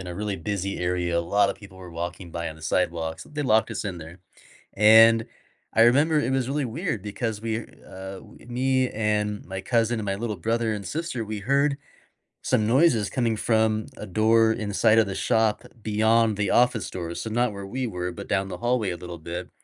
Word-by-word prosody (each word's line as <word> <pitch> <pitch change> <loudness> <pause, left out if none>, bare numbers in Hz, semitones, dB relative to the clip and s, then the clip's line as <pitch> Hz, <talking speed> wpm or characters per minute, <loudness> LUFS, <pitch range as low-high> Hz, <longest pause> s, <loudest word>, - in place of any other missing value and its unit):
in 95 - -8
a 90 - -6
really 105 -1 -2
busy 100 +2 -3
area, 90 -1 0
a - - +2
lotta 100 +3 +2
people 95 -2 -14
were 90 -1 -10
walking 85 +1 -6
by 85 0 -3
on 80 - -9
the 80 - -16
sidewalks, 80 -1 -1
they 150 0 -6
locked 110 -3 +2
us 105 - -4
in 95 -4 -4
there, 80 +3 -11 0.6
and 115 +2 +7 0.5
I 115 - +5
remember 145 +7 +4
it 130 - -1
was 130 -1 0
really 145 +1 -1
weird 130 - -3
because 105 +1 -3
we're, 115 0 -3 0.2
uh 95 +1 -8
w - - -16
me 130 +1 +1
and 105 -1 -1
my 95 +1 -5
cousin 115 +2 +1
and 105 - -5
my 95 - 0
little 110 0 -3
brother 115 +4 0
and 100 -3 -5
sister, 150 - -3
we 105 -1 -5
heard 140 +5 +2 0.7
some 105 - +1
noises 120 - +3
coming 115 -3 0
from 110 0 +1
a - - -7
door 110 +3 +3
inside 110 0 +2
of 110 - +3
the 95 - -4
shop 110 -2 +1 0.2
beyond 110 0 +2
the 100 -2 0
office 120 -6 +3
doors, 85 -2 -5
so 110 - -4
not 120 0 +1
where 100 -1 -7
we 125 +5 -3
were, 90 -3 -4
but 100 +2 -8
down 95 0 +1
the 95 - -6
hallway 120 -5 0
a 85 - -3
little 85 0 -8
bit, 85 +2 -6
110 Hz, 210 wpm, -25 LUFS, 95-115 Hz, 0.7 s, and